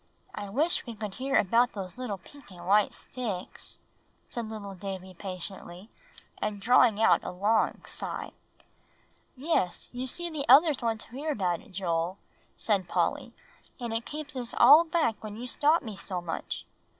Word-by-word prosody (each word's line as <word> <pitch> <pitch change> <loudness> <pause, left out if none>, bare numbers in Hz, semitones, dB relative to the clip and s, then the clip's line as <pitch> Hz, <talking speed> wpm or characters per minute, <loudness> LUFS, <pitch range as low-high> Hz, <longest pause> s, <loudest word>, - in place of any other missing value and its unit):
"I 205 - -6
wish 295 - +1
we 235 - -6
could 210 -2 -5
hear 270 +5 0
about 235 +5 +3
those 195 +2 -6 0.2
pink 285 -5 -16
and 175 -2 -11
white 205 +2 +4
sticks," 210 -8 -5 0.5
said 235 -2 -5
little 205 -3 -6
Davie 190 -1 -6
patiently, 185 +1 -7 0.5
and 210 -1 -2
drawing 235 0 +5
a 220 - +3
long 205 +5 +1
sigh. - - -2 1.1
"Yes, 260 - 0
you 250 +1 -4
see 345 +7 -2
the 285 -5 -4
others 290 +2 +7
want 225 -2 -1
to - - -10
hear 290 +5 -3
about 180 - 0
it, 245 - -18
Joel," 175 -1 -1 0.4
said 200 -5 0
Polly; - - 0 0.5
"and 235 -2 -3
it 225 +1 -2
keeps 300 -1 -6
us 245 -2 -3
all 310 +4 +9
back 315 -11 0
when 210 -1 -6
you 235 +3 -6
stop 295 +6 +3
me 220 -4 -6
so 190 -1 -4
much." 175 -2 -5
220 Hz, 160 wpm, -29 LUFS, 190-255 Hz, 1.1 s, all